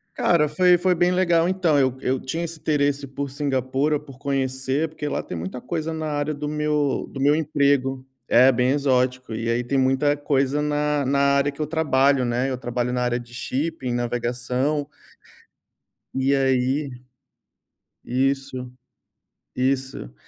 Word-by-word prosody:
Cara, 165 -4 +3
foi 180 +3 +4
foi 180 +1 +2
bem 175 +1 +2
legal. 175 -2 +3
Então 180 -5 +2
eu 130 -2 +2
eu 130 +1 0
tinha 165 +7 -4
esse 165 -1 -6
interesse 145 -2 0
por 140 +1 -5
Singapura, 135 +1 0
por 140 -3 -14
conhecer, 135 +2 -1
porque 150 -1 -6
lá 145 - -2
tem 90 - -7
muita 95 +9 -6
coisa 165 -1 -3
na 160 -1 -3
área 145 0 -1
do 145 0 -5
meu 150 -1 0
do 135 - -7
meu 145 +2 +4
emprego. 140 -4 +1 0.2
É, 130 +3 +6
bem 125 +1 +1
exótico. 130 -3 0
E 115 +1 -3
aí, 120 +1 0
tem 135 +3 -1
muita 135 +3 +2
coisa 140 0 0
na 150 -1 0
na 140 +2 +1 0.2
área 140 +1 +2
que 140 - -8
eu - - +1
trabalho, 140 -4 +2
né. 120 +2 0
Eu 130 - -2
trabalho 120 0 -2
na 125 0 -1
área 120 0 0
de 120 0 -13
shipping, 135 +1 -3
navegação. 125 +4 -1 1.3
E 135 +1 +2
aí 135 +2 +1 1.2
Isso. 130 0 -1 0.9
Isso. 130 - -1
140 Hz, 155 wpm, -23 LUFS, 130-150 Hz, 1.3 s, É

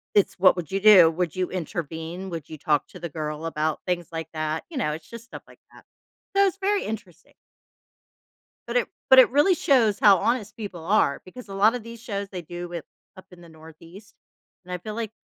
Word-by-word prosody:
it's, 205 - +3
"What 185 0 +6
would 170 -4 -5
you 195 - 0
do? 195 -6 +8
Would 170 -1 -2
you 185 -1 -1
intervene? 170 +1 -5
Would 165 -3 -6
you 155 - -8
talk 150 0 0
to 180 - -12
the 170 - -4
girl 155 0 -5
about 155 -1 -1
things 175 -2 -1
like 165 -1 -5
that?" 155 0 -3
You 335 - -11
know, 150 - 0
it's 155 +1 -9
just 230 -1 -9
stuff 255 - -11
like - - -18
that. - - -17 0.5
So, 395 0 +5
it's 385 -1 -1
very 400 +1 0
interesting. 195 -6 -8 1.3
But 235 - -5
it 245 - +1 0.2
but 265 - +9
it 260 - +7
really 295 +7 +4
shows 235 -10 +3
how 200 -3 +7
honest 225 +2 -1
people 195 -7 -7
are 185 -7 +2
because 235 +7 -12
a 195 - -9
lot 205 +3 +4
of 245 -3 -5
these 230 0 -10
shows 200 -4 -4
they 185 -3 -6
do 175 +2 -7
with 170 -2 -6 0.3
up 185 - -13
in 180 - -15
the 170 - -14
Northeast 165 +5 -15 0.5
and 180 - -7
I - - -2
feel 210 +5 -7
like 220 -1 -4
185 Hz, 220 wpm, -25 LUFS, 165-220 Hz, 1.3 s, but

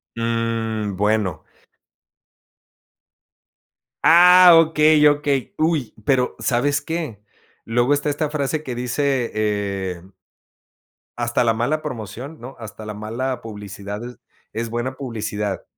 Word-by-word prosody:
Mm, 115 -2 -2
bueno. 105 -4 0 2.6
Ah, 180 +2 +8
okey 155 -2 +5
okey, 145 0 0
¡uy! 155 -8 0
Pero, 125 -2 +1
¿sabes 140 +3 +1
qué? 150 -9 -5 0.4
Luego 120 +4 +1
está 145 +1 0
esta 150 +1 -1
frase 150 0 -2
que 130 -5 -6
dice, 125 +1 -1
eh 100 -4 -2 1.2
hasta 120 +1 0
la 115 -1 +3
mala 120 +8 -1
promoción, 130 +2 -7
¿no? 130 +3 -10
Hasta 110 -1 -9
la 105 -1 -6
mala 120 +4 -4
publicidad, 105 -1 -7 0.5
es 115 +1 -3
buena 120 +3 -3
publicidad. 105 -6 -4
120 Hz, 105 wpm, -21 LUFS, 110-145 Hz, 2.6 s, Ah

